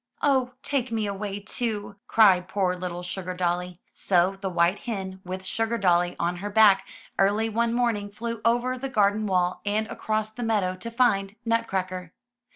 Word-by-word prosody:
"Oh, 260 -3 +2
take 260 -4 -1
me 220 -2 0
away, 200 0 -4
too,'' 205 -1 -4
cried 190 -5 +5
poor 190 -2 0
little 180 -1 -5
Sugar 180 +1 -5
dolly. 180 0 -2
So 185 0 +2
the 195 - -2
white 175 +2 +2
hen, 190 -4 -5
with 185 +1 -6
Sugardolly 185 -6 +1
on 175 +1 -1
her 205 +3 -4
back, 205 -2 +5 0.3
early 205 +3 +3
one 230 +1 +1
morning 230 -4 0
flew 230 +2 -5
over 245 +2 +1
the 270 +1 -4
garden 210 -2 +2
wall 180 -2 +1
and 210 +1 0
across 215 -1 -2
the 245 - -8
meadow 210 -5 0
to 210 +5 -7
find 215 -5 +1
Nutcracker. 185 -6 -1
205 Hz, 160 wpm, -26 LUFS, 185-225 Hz, 0.3 s, cried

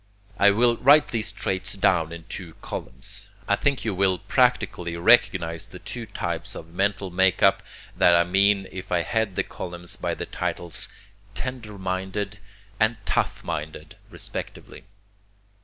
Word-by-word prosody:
I 100 - +7
will 115 +3 +3
write 145 +5 +6
these 110 -2 -1
traits 95 0 -2
down 85 -4 +2
in 85 -1 -8
two 85 -1 -7
columns. 60 +2 -6 0.2
I 100 - +4
think 140 +3 0
you 110 - 0
will 95 0 +2
practically 100 -9 +1
recognize 85 -4 +4
the - - -11
two - - -7
types - - -4
of 85 0 -10
mental 100 0 0
make 95 +1 +3
up 100 - +5 0.3
that 85 - +6
I 85 - +5
mean 95 +2 +3
if 95 0 -8
I 85 -1 +2
head 110 -3 -1
the - - +1
columns 90 -1 -7
by - - -2
the - - -4
titles 85 -2 -3 0.5
'tender 120 -5 -5
minded' 95 +2 -3 0.4
and 110 +1 +3
'tough - - 0
minded' 75 0 -5
respectively. - - -6
95 Hz, 150 wpm, -25 LUFS, 85-105 Hz, 0.5 s, I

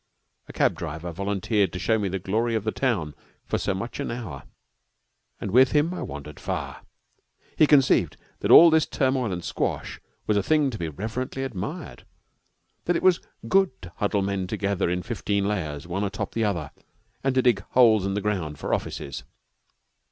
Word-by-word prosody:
A - - -9
cab - - +2
driver 80 +2 -6
volunteered 100 +1 0
to - - -3
show 110 +4 +1
me 100 - -1
the 95 - -2
glory 110 +5 -1
of 110 - -1
the 110 - -1
town 105 - -1 0.3
for - - -1
so 95 - -1
much 110 +5 -5
an - - -2
hour, 100 - -6 0.9
and 100 - -4
with 130 +4 +5
him 155 +4 +2
I - - -5
wandered 75 +1 -7
far. - - -4 0.7
He 155 - +5
conceived 140 -3 +4 0.2
that - - -2
all 170 0 +10
this 160 -1 +3
turmoil 130 -5 0
and 90 -1 -4
squash - - -3 0.3
was 105 - +2
a - - +3
thing 150 +4 +2
to 110 - -7
be 85 - -2
reverently 115 - -4
admired, 135 - -6 0.8
that 175 - +1
it - - -1
was 185 -2 +4 0.3
good 190 -8 +2
to 90 0 -10
huddle 100 -1 0
men 95 -1 -2
together 100 -1 -1
in 90 0 -1
fifteen 100 -3 -1
layers, 80 -8 -3
one 90 +3 -2
atop 100 0 -3
of - - -24
the 115 -1 0
other, 85 -8 -2 0.5
and 135 -1 +1
to 130 - +3
dig 120 -6 +4
holes 115 -5 +6
in 100 0 -1
the 105 - -1
ground 90 -8 -2
for - - -3
offices. 70 - -3
105 Hz, 190 wpm, -25 LUFS, 90-125 Hz, 0.9 s, all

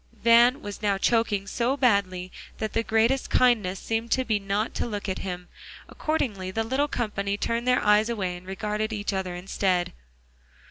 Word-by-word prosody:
Van 240 +3 +5
was 205 0 -7
now 200 -2 +1
choking 210 -2 +1
so 240 +6 -1
badly 190 -8 +1 0.3
that 220 - -3
the 225 - +2
greatest 230 +4 +1
kindness 210 -7 +3
seemed 225 +1 -2
to 260 +1 +1
be 215 -3 +1
not 200 +2 -2
to - - -2
look 205 -3 -4
at 190 - -2
him. 180 -1 -5 0.4
Accordingly 215 -12 -2
the 225 +4 -1
little 265 +6 0
company 205 -6 -2
turned 235 +3 -2
their 250 0 +3
eyes 210 +2 +4
away, 190 -6 -2
and 180 +1 -12
regarded 210 +2 -2
each 205 -1 -2
other 190 -2 -3
instead. 180 0 -1
210 Hz, 175 wpm, -26 LUFS, 195-235 Hz, 0.4 s, Van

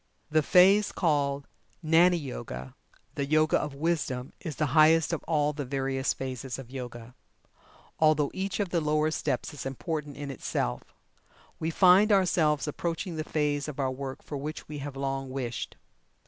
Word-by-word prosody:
The 155 0 +4
phase 195 +6 +5
called 140 -4 0 0.4
"Gnani 170 +3 +5
Yoga" 65 - -6 0.4
the 140 - -2
Yoga 155 +1 +3
of 150 -2 -5
Wisdom 140 -5 -2
is 160 -5 -6
the 155 - 0
highest 160 +1 +5
of 165 - -3
all 150 -2 +1
the 145 0 -4
various 135 0 -1
phases 130 -1 -5
of 130 -2 -10
Yoga, 120 -2 -7 0.9
although 155 -2 +3
each 190 +1 -3
of 200 -3 0
the 170 -1 0
lower 155 +1 +1
steps 145 -1 -2
is 145 - -7
important 145 +1 -4
in 145 -1 -5
itself. - - -2 0.8
We 160 - -1
find 185 +5 +6
ourselves 165 -7 +3
approaching 165 +3 -3
the 155 - -1
phase 150 -2 -1
of 145 -2 -7
our 135 -1 +1
work 135 0 -6
for 145 - -5
which 150 +2 -6
we 150 -1 -6
have 140 0 -6
long 135 -1 -3
wished. 130 -3 -4
150 Hz, 160 wpm, -28 LUFS, 135-160 Hz, 0.9 s, find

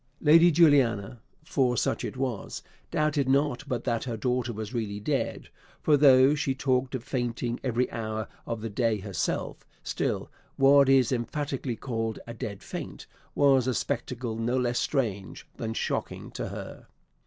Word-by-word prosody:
Lady 165 +3 +6
Juliana, 130 - +3 0.2
for 130 -5 +1
such - - 0
it - - -5
was, 130 -6 -3 0.3
doubted 150 -3 +1
not 140 0 +2
but 125 -3 -2
that 115 -1 -1
her 120 -3 -3
daughter 125 +2 -1
was 110 +1 -6
really 105 -4 -3
dead; 105 - -2 0.3
for 150 - +5
though 135 -1 +6
he 145 -3 -1
talked 130 -1 0
of 125 - -5
fainting 120 -1 -2
every 125 -1 +1
hour 110 -1 -4 0.2
of 115 -2 -3
the 115 - -4
day 115 0 +1
herself, 95 -4 -3 0.2
still - - -2 0.2
what 140 0 +6
is 135 -2 +4
emphatically 130 +1 -2
called 115 -3 -3
a 115 - -7
dead 100 -3 -6
faint - - -7 0.3
was 135 -3 +4
a 130 - +1
spectacle 120 +2 -3
no 120 +3 0
less 120 -1 0
strange 105 -9 -2
than 110 - -3
shocking - - -3
to - - -4
her. - - -8
125 Hz, 155 wpm, -27 LUFS, 115-135 Hz, 0.3 s, Lady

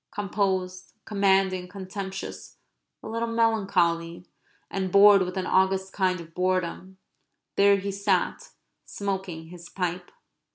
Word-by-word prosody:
Composed, 190 -2 -2
commanding, 190 -3 +2
contemptuous, 190 0 -7 0.5
a - - -7
little 230 +1 -2
melancholy, 190 -7 +1 0.4
and 190 -1 -3
bored 200 0 +7
with 180 +1 -3
an 185 - -1
august 190 +1 +1
kind 185 -2 +1
of 165 -1 -11
boredom, 185 +1 -2 0.6
there 200 0 +5
he 200 +1 -3
sat 195 -2 -1 0.3
smoking 190 -5 -5
his 175 0 -11
pipe. 180 -1 -3
190 Hz, 115 wpm, -26 LUFS, 180-200 Hz, 0.6 s, bored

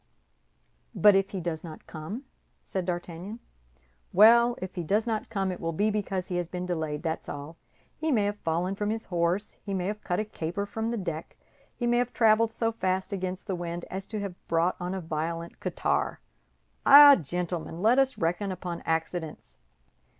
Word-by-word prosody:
"But 210 -1 +7
if 195 0 +2
he 195 - -4
does 165 -2 -3
not 160 -3 -10
come?" 170 - -7 0.4
said 190 -2 -3
D'Artagnan. 175 +3 -4 0.7
"Well, 235 +4 +6
if 185 0 -6
he 180 - -3
does 205 +7 +1
not 225 -2 -2
come, 195 -3 -1
it 180 - -6
will 165 0 -2
be 210 +6 +1
because 195 -3 -2
he 180 -3 -2
has 175 -1 -1
been 180 +1 -4
delayed, 160 -4 -3
that's 160 -1 -3
all. 145 +3 -7 0.4
He 315 0 -1
may 220 -6 +3
have 205 0 -2
fallen 170 +4 -1
from 205 +1 -2
his 225 +1 -2
horse, 175 +3 -1
he 200 -2 -3
may 180 -1 -1
have 210 +2 -4
cut 180 -1 -1
a 215 - -1
caper 200 0 -4
from 220 +2 -3
the 235 - -2
deck; 170 -5 -5 0.4
he 240 - -3
may 240 0 +3
have 245 0 -1
traveled 225 0 +4
so 225 0 -1
fast 190 -3 -1
against 185 -1 -3
the 195 - -2
wind 175 0 -5
as 190 +1 -4
to 215 - -4
have 195 -3 -7
brought 170 +2 +2
on 180 +1 -3
a 190 - -3
violent 165 +1 -4
catarrh. - - -1 0.6
Eh, 285 0 +10
gentlemen, 170 +1 -4
let 240 +5 +5
us 270 -1 +2
reckon 180 +4 -1
upon 180 -2 -5
accidents! 160 - -3
185 Hz, 190 wpm, -28 LUFS, 170-210 Hz, 0.7 s, Eh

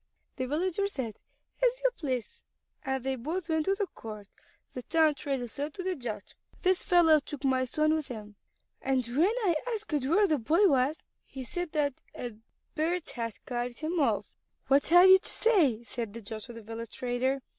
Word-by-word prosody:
The 255 -1 -2
villager 365 +7 0
said, 255 - -5 0.4
"As - - +3
you - - +4
please"; 255 -8 -4 0.4
and 265 -1 -2
they 265 0 -1
both 325 +8 -4
went 320 -1 +1
to 390 - +2
the 405 0 0
court. 215 - -9 0.5
The 250 - -5
town 315 +3 +3
trader 270 -3 -3
said 290 +5 -5
to 370 - -5
the 370 0 -1
judge: 250 -6 -6 0.3
"This 370 -1 +3
fellow 330 -3 +5
took 290 0 -8
my 260 -1 +2
son 305 +4 +2
with 315 -2 -1
him 210 -3 -8 0.5
to - - -21
the 270 - +2
river, 255 -2 0
and 240 - -6
when 365 - +3
I 345 -4 +3 0.2
asked 435 -6 -7
where 345 +10 +4
the 310 -6 +1
boy 330 - +4
was, 275 0 +2 0.3
he 265 - -8
said 350 +6 -4
that 290 -3 0
a 245 -2 -5 0.4
bird 330 +2 -1
had 230 -3 -5
carried 245 -1 -3
him 325 +2 -2
off." 290 - +2 0.4
"What 280 +1 +4
have 350 +3 +8
you 380 0 +9
to - - -5
say?" 315 - +3
said 230 -3 -5
the 230 - -7
judge 215 +1 -6
to 240 - -10
the 230 -1 -10
village 225 +1 -7
trader. 255 +2 -1
285 Hz, 200 wpm, -29 LUFS, 245-345 Hz, 0.5 s, you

